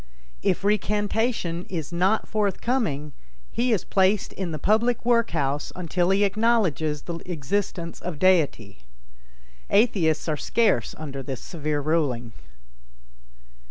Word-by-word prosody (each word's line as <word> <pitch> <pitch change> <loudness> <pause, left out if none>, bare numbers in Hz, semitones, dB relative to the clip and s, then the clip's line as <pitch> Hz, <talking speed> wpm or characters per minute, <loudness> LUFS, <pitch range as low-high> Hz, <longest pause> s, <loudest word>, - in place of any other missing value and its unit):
If 195 -1 0
recantation 205 -3 0
is 165 -3 -4
not 190 +5 +2
forthcoming, 200 - -1 0.4
he 245 +1 0
is 210 -6 +1
placed 195 +1 +2
in 185 -3 -4
the 155 - -3
public 225 - +1
work 235 -1 +3
house 145 -2 -1
until 180 0 0
he 195 +1 +3
acknowledges 200 -9 +1
the 170 -1 -5
existence 170 +2 -3
of 175 -4 -5
Deity. 145 - +2 0.9
Atheists 190 -9 +2
are 155 -2 0
scarce 210 - +1
under 140 -3 -6
this 130 -1 -5
severe 150 -3 -3
ruling. 140 -7 0
180 Hz, 120 wpm, -25 LUFS, 150-210 Hz, 0.9 s, work